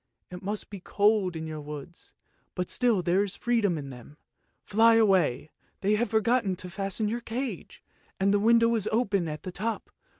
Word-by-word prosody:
It 180 - -8
must 205 +2 -4
be 200 - -7
cold 200 -1 +1
in 160 0 -5
your 155 -1 -6
woods, 150 +3 -10 0.4
but 180 -1 -2
still 235 -7 +2
there 180 +4 +2
is 200 -1 -4
freedom 225 -8 +1
in 140 -2 -7
them. 125 +4 -13 0.5
Fly 225 +2 +5
away! 185 - +2 0.3
they 200 +2 +2
have 230 +3 +1
forgotten 220 -2 +1
to 180 0 -8
fasten 195 +3 -2
your 235 +3 -2
cage, 245 +3 -5 0.4
and 195 +1 +2
the 205 - +3
window 230 +2 +4
is 220 -3 -1
open 200 -6 +1
at 150 -1 -6
the 185 - -5
top. 220 +4 -4
200 Hz, 185 wpm, -27 LUFS, 175-225 Hz, 0.5 s, Fly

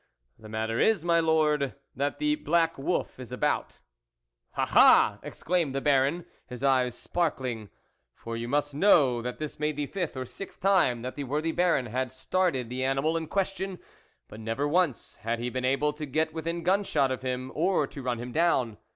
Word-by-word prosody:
"The 110 - -12
matter 110 +1 -2
is, 215 -7 +2
my 170 -1 +4
Lord, 155 -4 +2 0.2
that 140 +1 -1
the 300 0 +1
black 170 - +1
wolf 140 -1 -2
is 125 -1 -9
about." 145 +4 -1 0.4
" - - -31
Ah! - - +2
ah! - - +6
" - - -31
exclaimed 165 -6 -2
the - - +1
Baron, 140 +4 +2 0.2
his 125 +1 -8
eyes 130 -3 +2
sparkling; 130 - -2 0.5
for 115 0 -7
you 115 +1 -4
must 145 +2 0
know 140 -7 +4
that 125 +1 -5
this 155 -1 -6
made 150 0 -1
the 145 0 -2
fifth 175 -3 -4
or 130 - -3
sixth 195 - -9
time 180 -12 +2
that 130 - -4
the 145 - -4
worthy 150 +5 -1
Baron 170 -6 +2
had 125 +2 -2
started 135 -1 -1
the 125 +2 -3
animal 135 +5 +1
in 165 -1 -2
question, 195 +1 -2 0.5
but 105 - -11
never 115 +6 -2
once 160 -4 0
had 115 +2 -2
he 120 +1 -3
been 130 0 -2
able 140 +3 +1
to 150 0 -6
get 155 +3 0
within 165 +1 -3
gun 195 +4 +2
shot 140 -8 +1
of 130 - -3
him 130 0 -3
or 170 -1 +1
to 140 - -9
run 125 -2 -2
him 120 +2 -6
down. 130 -9 +1
140 Hz, 195 wpm, -28 LUFS, 125-165 Hz, 0.5 s, ah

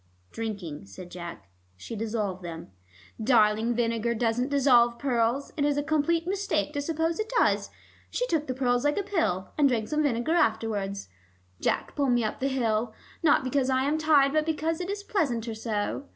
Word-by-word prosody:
"Drinking," 200 - -5
said 175 - -11
Jack. 170 - -8 0.3
"She 225 - -7
dissolved 210 -4 -2
them 165 - -8 0.2
" 90 - -12
"Darling, 225 -1 +3
vinegar 235 0 0
doesn't 240 +3 0
dissolve 245 -4 +4
pearls: 245 0 0
it 285 - +1
is 290 0 +2
a 290 - +1
complete 315 +2 +1
mistake 360 -6 -1
to 285 - -1
suppose 325 +3 -1
it 435 +2 -3
does. - - +2 0.4
She - - -1
took 320 -10 -1
the 255 - -2
pearls 245 -2 +1
like 290 0 +1
a 405 - 0
pill, 320 - -1
and 285 -2 +5
drank 225 -4 -1
some 305 0 +1
vinegar 265 +1 +1
afterwards. 220 - 0 0.5
Jack, - - -1
pull 280 -2 +1
me 240 -1 +3
up 215 - -3
the 270 - 0
hill, 230 -4 0 0.3
not 305 -5 +4
because 260 0 0
I 260 0 +2
am 295 +3 +1
tired, 295 -3 +4
but 310 0 +3
because 320 +1 -1
it 360 - -4
is 405 0 -4
pleasanter 245 - -1
so. 220 +4 -3
250 Hz, 185 wpm, -27 LUFS, 220-300 Hz, 0.5 s, and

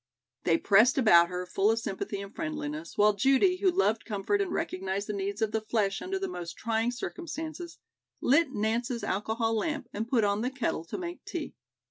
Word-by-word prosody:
They 165 -1 +4
pressed 220 +9 +5
about 170 -9 +6
her, 180 +1 -4
full 195 +3 +1
of 225 - +2
sympathy 200 -2 -4
and 200 0 -9
friendliness, 155 +1 -5
while 210 0 +5
Judy, 270 - +3
who 380 0 +3
loved 345 - +1
comfort 215 - -1
and 385 -3 -2
recognized 195 - -2
the 210 - -4
needs 200 +2 -2
of 215 - 0
the 220 - 0
flesh 215 -3 0
under 385 +1 -2
the 385 0 -2
most 175 - -6
trying 225 +1 0
circumstances, 320 +5 -6 0.4
lit 290 +2 +3
Nance's 235 +2 -1
alcohol 220 +3 -1
lamp 280 +3 -2
and 220 +2 -3
put 235 -3 +2
on 205 +1 +1
the 250 - 0
kettle 255 -11 -2
to - - -5
make 345 -1 -6
tea. 350 -6 -5
225 Hz, 190 wpm, -29 LUFS, 200-285 Hz, 0.4 s, about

